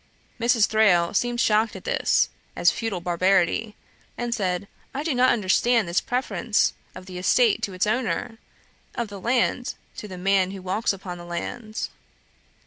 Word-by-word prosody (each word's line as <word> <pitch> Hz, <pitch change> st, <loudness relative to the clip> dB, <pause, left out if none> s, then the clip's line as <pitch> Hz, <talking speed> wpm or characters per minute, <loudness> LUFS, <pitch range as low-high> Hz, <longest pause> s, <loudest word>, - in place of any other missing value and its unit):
Mrs. 235 Hz, -2 st, +4 dB
Thrale 190 Hz, -6 st, +3 dB
seemed 240 Hz, +3 st, 0 dB
shocked 220 Hz, 0 st, +2 dB
at -, -, -9 dB
this, -, -, +2 dB, 0.3 s
as -, -, +4 dB
feudal 225 Hz, -6 st, -3 dB
barbarity; 185 Hz, +4 st, +1 dB, 0.4 s
and 240 Hz, -1 st, -2 dB
said, 190 Hz, -4 st, -1 dB, 0.3 s
'I 285 Hz, -, -2 dB
do 315 Hz, -2 st, 0 dB
not 255 Hz, +1 st, +4 dB
understand 225 Hz, +1 st, +2 dB
this 170 Hz, +2 st, +1 dB
preference 245 Hz, -3 st, 0 dB, 0.2 s
of 185 Hz, -, -10 dB
the 185 Hz, -1 st, -7 dB
estate 230 Hz, +4 st, +3 dB
to 205 Hz, -3 st, -3 dB
its 185 Hz, +2 st, 0 dB
owner; 225 Hz, 0 st, -1 dB, 0.6 s
of 235 Hz, -3 st, -3 dB
the 200 Hz, -2 st, -9 dB
land 245 Hz, +1 st, 0 dB, 0.2 s
to 210 Hz, -, -6 dB
the 185 Hz, -2 st, -8 dB
man 190 Hz, 0 st, +2 dB
who 195 Hz, 0 st, -7 dB
walks 190 Hz, +5 st, 0 dB
upon 185 Hz, -3 st, -7 dB
that 175 Hz, -, -9 dB
land.' 215 Hz, +6 st, -4 dB
210 Hz, 160 wpm, -24 LUFS, 185-235 Hz, 0.6 s, Mrs